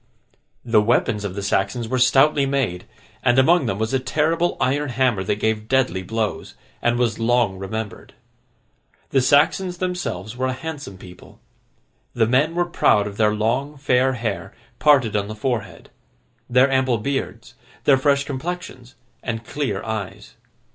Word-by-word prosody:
The 115 -3 +4
weapons 110 -1 +1
of 95 -2 -4
the 100 - -4
Saxons 100 +4 -1
were 130 +2 -1
stoutly 135 +3 +4
made, 130 -11 -1 0.4
and 120 0 +2
among 140 +1 +4
them 95 - -1
was 110 +3 -2
a 135 - +2
terrible 160 +6 0
iron 140 +2 0
hammer 125 -5 +1
that 95 - 0
gave 110 0 -1
deadly 125 -8 +1
blows, 110 +2 -3 0.3
and 120 0 +1
was 120 -3 0
long 115 -4 +1
remembered. 105 +2 -6 1.0
The 135 - +3
Saxons 155 +7 +2
themselves 175 - -4
were 130 +1 -1
a 130 - -1
handsome 145 -7 -7
people. 90 -1 -14 0.8
The 115 -2 +3
men 140 +8 +2
were 175 0 +1
proud 105 -11 +2
of 100 -1 -7
their 105 -1 +2
long 125 +7 -1
fair 130 -1 +2
hair, 115 -5 -4 0.2
parted 135 -8 +4
on 100 -1 0
the 110 - -6
forehead; 110 -1 -4 0.6
their 125 +2 +5
ample 130 -2 +2
beards, 115 -1 -4 0.3
their 135 -2 +4
fresh 140 0 +2
complexions, 140 -3 -6 0.3
and 115 -1 -4
clear 130 -9 -3
eyes. 110 -4 -6
125 Hz, 155 wpm, -22 LUFS, 110-140 Hz, 1.0 s, their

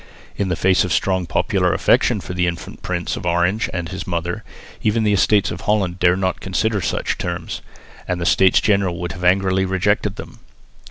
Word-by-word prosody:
In 100 -2 -1
the 90 - 0
face 95 +2 +3
of 90 - -3
the 80 - +2
strong 95 +1 0
popular - - +1
affection - - +2
for - - -7
the 90 0 +1
infant 85 0 -6
Prince 85 -1 -2
of - - -7
Orange 90 +5 +1
and 85 -2 -4
his 95 +1 -6
mother, 85 0 -3 0.4
even 110 +1 +1
the 105 -1 +2
Estates 100 0 +3
of - - -6
Holland 95 -4 0
dared 90 0 +4
not 95 -1 -1
consider 100 +3 0
such - - -2
terms, 85 -1 -4 0.5
and 90 -1 -1
the 85 - -2
States 95 +1 +4
General 100 -4 +1
would 90 0 -3
have 90 - -8
angrily 95 +1 +3
rejected 95 +2 0
them. - - -10
95 Hz, 200 wpm, -20 LUFS, 90-95 Hz, 0.5 s, dared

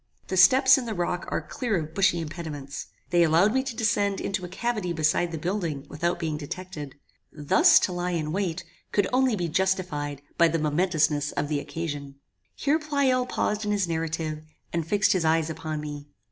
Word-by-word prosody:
The 190 - -1
steps 260 +7 +7
in 245 - -6
the 220 - -3
rock 175 0 -2
are - - -2
clear 235 -6 -2
of 155 -1 -5
bushy 190 -2 +2
impediments. 155 -3 -6 0.2
They 175 -1 +4
allowed 170 +6 +4
me 265 - +2
to 260 -3 -5
descend 205 -4 +1
into 195 -1 -2
a - - -4
cavity 205 -1 -2
beside 160 +2 +1
the 165 - -4
building 165 -4 -3
without 170 +3 -1
being 160 -3 -2
detected. 150 -2 -7 0.4
Thus 155 +5 +5
to - - 0
lie 175 0 -2
in 155 -1 -3
wait 180 -1 -2 0.3
could 205 - +2
only 255 -2 +3
be 175 -4 -2
justified 155 -6 -1 0.2
by 170 - +7
the 165 0 0
momentousness 155 -2 +1
of 145 - -2
the 150 -2 0
occasion." 145 -1 -5 0.4
Here 295 +3 +1
Pleyel 280 -5 +1
paused 210 -3 -1
in 210 - -2
his 200 -3 +1
narrative, 160 -1 -3 0.3
and 165 -2 -1
fixed 205 +3 +3
his 185 -3 0
eyes 160 0 +2
upon 155 -1 -4
me. 145 -1 -7
170 Hz, 190 wpm, -26 LUFS, 155-200 Hz, 0.4 s, steps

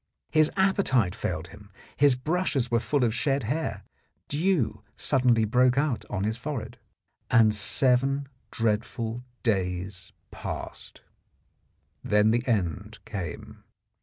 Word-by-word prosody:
His 155 0 +4
appe 190 +1 +3
tite 115 - +2
failed - - -4
him; - - -15 0.2
his 140 -2 +5
brushes 140 -3 -1
were 115 - +3
full 140 +3 0
of 115 -2 +2
shed 135 +3 0
hair; 150 +9 -2 0.5
dew 160 - 0
suddenly 120 -4 +2
broke 125 +3 +3
out 140 -4 0
on 100 -2 -2
his 110 +2 -1
forehead. 125 -3 -5 0.5
And 115 -3 +5
seven 130 +6 +2 0.2
dreadful 115 +1 -2 0.2
days 95 -2 -2 0.2
passed. - - -7 1.0
Then 105 +1 +3
the 120 +1 +2
end 105 - -1
came. 95 -8 -7
120 Hz, 120 wpm, -27 LUFS, 105-140 Hz, 1.0 s, his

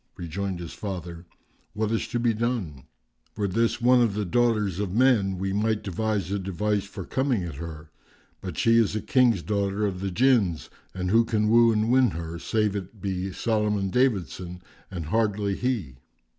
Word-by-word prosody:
Rejoined 90 +2 -4
his 85 -2 -7
father, 90 -4 -6 0.5
"What 110 0 -1
is 115 - -1
to 120 - -2
be 120 -1 +2
done? 105 - -3 0.5
Were 105 -1 0
this 115 +4 0
one 125 +1 +5
of 115 -4 +1
the 105 -1 -1
daughters 105 -2 +1
of 100 -2 -2
men 110 -7 +3
we 95 +1 -2
might 110 +1 0
devise 100 -1 -2
a 100 - 0
device 100 +2 -1
for 100 -2 -8
coming 130 -7 0
at 85 -2 -5
her; 80 -1 -8 0.5
but 90 -4 -6
she 115 0 +4
is 105 -2 +1
a 110 - -1
King's 120 -9 +3
daughter 100 0 0
of 95 -3 -2
the 95 +1 -2
Jinns 105 -6 +2 0.2
and 90 0 -2
who 115 +2 +5
can 110 -2 0
woo 115 +1 +6
and 110 +1 +1
win 130 -1 +5
her, 85 0 -6
save 105 +3 0
it 100 +2 -6
be 95 -1 -3
Solomon 105 -2 0
David 120 - +2
son, 90 +5 -9 0.3
and 90 -5 -5
hardly 105 +1 0
he? 105 - -2
100 Hz, 185 wpm, -26 LUFS, 90-115 Hz, 0.5 s, woo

